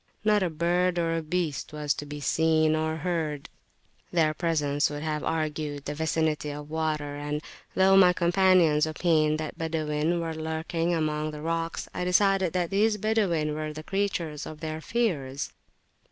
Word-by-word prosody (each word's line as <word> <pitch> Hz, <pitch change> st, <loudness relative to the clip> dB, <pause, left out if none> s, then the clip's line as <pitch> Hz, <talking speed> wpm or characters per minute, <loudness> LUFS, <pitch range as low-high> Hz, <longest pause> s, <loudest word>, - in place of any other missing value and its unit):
Not 210 Hz, -1 st, +3 dB
a 185 Hz, -, +1 dB
bird 175 Hz, +3 st, +1 dB
or 165 Hz, -1 st, +1 dB
a 165 Hz, -, -1 dB
beast 160 Hz, -3 st, -2 dB
was 150 Hz, -1 st, 0 dB
to 145 Hz, -, -7 dB
be 145 Hz, 0 st, -6 dB
seen 155 Hz, +1 st, +2 dB
or 160 Hz, 0 st, -1 dB
heard; 160 Hz, -5 st, -2 dB, 0.6 s
their 160 Hz, -3 st, +3 dB
presence 150 Hz, -4 st, +1 dB
would 145 Hz, 0 st, -5 dB
have 155 Hz, -1 st, -2 dB
argued 155 Hz, -2 st, -2 dB
the 145 Hz, -, -3 dB
vicinity 155 Hz, -1 st, 0 dB
of 145 Hz, +1 st, -7 dB
water; 155 Hz, -2 st, -2 dB
and, 145 Hz, +1 st, -3 dB, 0.4 s
though 190 Hz, +1 st, +5 dB
my 185 Hz, -2 st, +7 dB
companions 175 Hz, -3 st, +4 dB
opined 155 Hz, -1 st, +2 dB
that 155 Hz, -1 st, -6 dB
Badawin 160 Hz, +1 st, 0 dB
were 165 Hz, -1 st, -3 dB
lurking 160 Hz, +2 st, -2 dB
among 155 Hz, -2 st, 0 dB
the 150 Hz, -1 st, -7 dB
rocks, 165 Hz, 0 st, -2 dB
I 180 Hz, -, -2 dB
decided 190 Hz, 0 st, +3 dB
that 175 Hz, -2 st, -1 dB
these 210 Hz, +2 st, +2 dB
Badawin 190 Hz, -8 st, +1 dB
were 155 Hz, 0 st, -3 dB
the 155 Hz, +1 st, -8 dB
creatures 170 Hz, -6 st, -2 dB
of 155 Hz, -, -9 dB
their 155 Hz, 0 st, -4 dB
fears. 155 Hz, -, -1 dB
160 Hz, 165 wpm, -27 LUFS, 150-175 Hz, 0.6 s, my